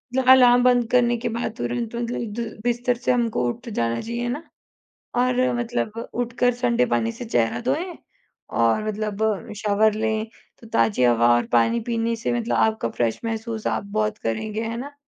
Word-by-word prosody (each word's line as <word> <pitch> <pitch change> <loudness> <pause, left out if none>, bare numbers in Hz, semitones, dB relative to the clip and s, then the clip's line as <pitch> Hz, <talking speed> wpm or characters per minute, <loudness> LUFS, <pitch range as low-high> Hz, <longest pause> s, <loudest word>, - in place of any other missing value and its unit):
मतलब 260 -1 +2
अलार्म 245 -1 +7
बंद 245 -2 +3
करने 240 -1 +3
के 230 - -3
बाद 230 -1 -3
तुरंत 235 -1 -3
मतलब 235 -2 -3
द 225 -2 -5
बिस्तर 245 +1 +1
से 250 +1 0
हमको 230 - +1
उठ 235 - -6
जाना 115 - -1
चाहिए 235 +1 -3
ना, 290 +7 -4 0.7
और 255 +1 +2
मतलब 230 -1 -3
उठकर 245 +1 +1
ठंडे 240 - +1
पानी 115 -1 0
से - - -8
चेहरा 115 - 0
धोएँ 310 +9 -2 0.6
और 115 - +2
मतलब 215 0 -2
शावर 210 +1 +2
लें, 220 0 -1 0.3
तो 230 - -13
ताज़ी 115 - +2
हवा 120 -1 +4
और 120 - +1
पानी 120 - +3
पीने 230 0 0
से 230 +2 -2
मतलब 230 - -1
आपका 220 - +1
फ्रेश 115 -1 -1
महसूस 225 0 -4
आप - - -1
बहुत 215 +1 -1
करेंगे 215 - -3
है 225 +1 -3
ना? 280 +4 -7
230 Hz, 175 wpm, -23 LUFS, 210-245 Hz, 0.7 s, अलार्म